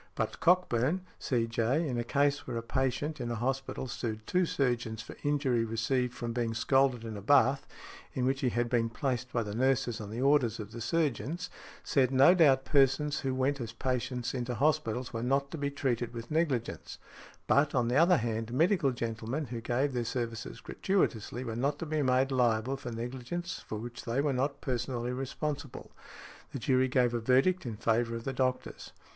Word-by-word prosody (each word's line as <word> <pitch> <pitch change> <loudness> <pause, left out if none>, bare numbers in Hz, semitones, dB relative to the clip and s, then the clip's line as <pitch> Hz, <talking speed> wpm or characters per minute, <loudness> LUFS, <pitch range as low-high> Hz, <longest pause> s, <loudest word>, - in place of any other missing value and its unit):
But - - -2
Cockburn, 175 -2 +2 0.2
C.J., 120 +5 0
in 125 -3 -2
a - - 0
case 145 +3 +1
where 120 -2 -3
a 115 - -3
patient 135 +5 -1
in 120 - -3
a 120 - -2
hospital 135 +3 -2
sued 110 -3 -4
two 180 -1 +1
surgeons 120 -6 -1
for - - -10
injury 140 -5 +1
received 125 +3 -1
from 120 -1 -4
being 115 -2 -1
scalded 130 0 +2
in 110 -2 -6
a 100 - -6
bath, 135 +4 +4 0.5
in 125 - 0
which 135 +1 0
he 130 - +2
had 120 0 0
been 115 -1 +1
placed 125 0 -2
by 120 - 0
the 105 -1 -5
nurses 125 -1 +1
on 105 - -7
the 110 +3 -5
orders 135 -4 +3
of 105 -1 -7
the 115 0 -7
surgeons, 160 - -1 0.3
said, 130 -3 +2
no 135 +6 +6
doubt 140 -7 +4
persons 140 +1 +3
who 130 -1 -2
went 135 +1 0
as 115 -1 -5
patients 125 0 -2
into 125 -1 -3
hospitals 130 -3 0
were 115 - -3
not 135 +3 0
to 165 - -5
be 140 0 0
treated 125 -4 -2
with 115 +3 -7
negligence; 150 -7 -1 0.5
but, 145 +1 +3
on 125 -2 +2
the 120 - 0
other 170 +4 +6
hand, 115 0 -2
medical 165 - +3
gentlemen 115 +4 -3
who 120 -2 -6
gave 130 +4 0
their 120 -1 0
services 115 -1 -4
gratuitously 125 - -1
were 115 -3 -4
not 140 +4 0
to 165 - -5
be 155 -1 -1
made 130 0 +2
liable 125 0 +2
for 125 -2 -7
negligence 125 +9 -5
for 110 - -4
which 120 +3 -7
they 120 +2 -1
were 140 -1 +1
not 140 +2 -1
personally 125 -1 -2
responsible. 140 +1 -4 0.6
The - - -2
jury 130 +1 +2
gave 125 -2 +2
a 120 - 0
verdict 130 +8 +2
in 110 -3 -5
favour 115 +1 +1
of 115 - -5
the 135 - -3
doctors. 130 0 -2
125 Hz, 190 wpm, -30 LUFS, 115-140 Hz, 0.6 s, no